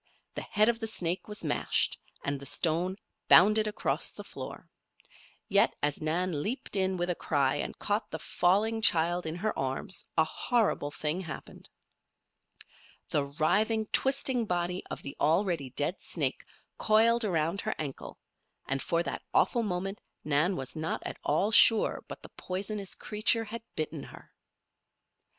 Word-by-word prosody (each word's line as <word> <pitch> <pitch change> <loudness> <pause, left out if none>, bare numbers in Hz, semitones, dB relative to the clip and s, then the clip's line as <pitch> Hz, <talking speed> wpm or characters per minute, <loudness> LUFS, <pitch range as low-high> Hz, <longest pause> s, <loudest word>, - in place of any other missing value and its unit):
The - - -4
head 210 +1 +2
of 235 -1 +2
the 225 - -3
snake 180 -4 -2
was 210 -3 -7
mashed, 150 - +1 0.2
and 140 -1 -2
the 140 - -9
stone 170 +6 +1 0.3
bounded 215 +4 +6
across 210 - -1
the - - -10
floor. - - -9 0.8
Yet, 200 +1 +4
as 145 -1 0
Nan 160 0 0
leaped 230 - -3
in 190 -1 +1
with 175 0 0
a - - +1
cry 140 -5 0
and - - -4
caught 210 +1 -1
the 160 - -4
falling 210 +8 +1
child 175 -2 +2
in 160 - -3
her 215 +4 -2
arms, 135 +7 -2
a 160 - +6
horrible 220 -4 0
thing 155 +4 -2
happened. 165 -4 -9 1.4
The 145 - +1
writhing, 210 +10 +1
twisting 265 -3 +2
body 180 0 -1
of - - -6
the 140 - -7
already 165 -3 +1
dead 145 +8 -2
snake - - -2 0.3
coiled 225 +2 +4
around 170 -1 0
her - - -2
ankle 145 -4 -6 0.5
and 135 0 -1
for 170 0 0
that - - -4
awful 240 - +3
moment 195 -1 -3 0.2
Nan 155 +6 +2
was 135 0 -5
not 160 +1 -3
at - - -6
all 205 +3 +1
sure 225 0 +6
but - - -9
the - - -10
poisonous 195 +1 -3
creature 215 +2 +1
had 225 +1 -7
bitten 155 -1 -3
her! - - -14
180 Hz, 155 wpm, -30 LUFS, 155-215 Hz, 1.4 s, bounded